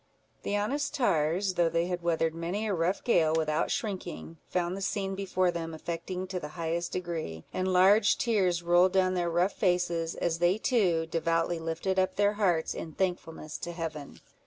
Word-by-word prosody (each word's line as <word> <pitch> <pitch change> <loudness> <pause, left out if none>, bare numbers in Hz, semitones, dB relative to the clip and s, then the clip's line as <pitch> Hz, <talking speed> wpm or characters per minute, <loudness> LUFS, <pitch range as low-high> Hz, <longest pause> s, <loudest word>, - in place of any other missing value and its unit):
The 205 - -1
honest 280 +9 -1
tars, 185 - +1
though 175 -2 +2
they 170 +1 +1
had 175 -1 -3
weathered 165 -1 +1
many 175 +6 -3
a 210 - 0
rough 175 +2 0
gale 160 -9 +3
without 155 -1 0
shrinking, 180 -5 -4
found 180 0 -1
the 195 - -6
scene 195 0 -2
before 185 -2 0
them 165 -1 -5
affecting 170 +3 -4
to 185 -1 -4
the 150 - -6
highest 170 +1 -2
degree; 165 - -4
and 185 - -1
large 195 +4 +5
tears 185 -7 +1
rolled 175 +2 +4
down 185 -1 +3
their 175 -2 0
rough 175 +4 +1
faces, 175 -3 0
as 165 -1 -1
they 175 +3 +3
too 190 -9 +2
devoutly 165 +1 0
lifted 165 +4 -1
up 185 - +1
their 205 0 +3
hearts 180 -6 +1
in 160 - -7
thankfulness 165 -4 -3
to 175 0 -5
Heaven. 160 -4 -6
175 Hz, 180 wpm, -29 LUFS, 165-190 Hz, -, large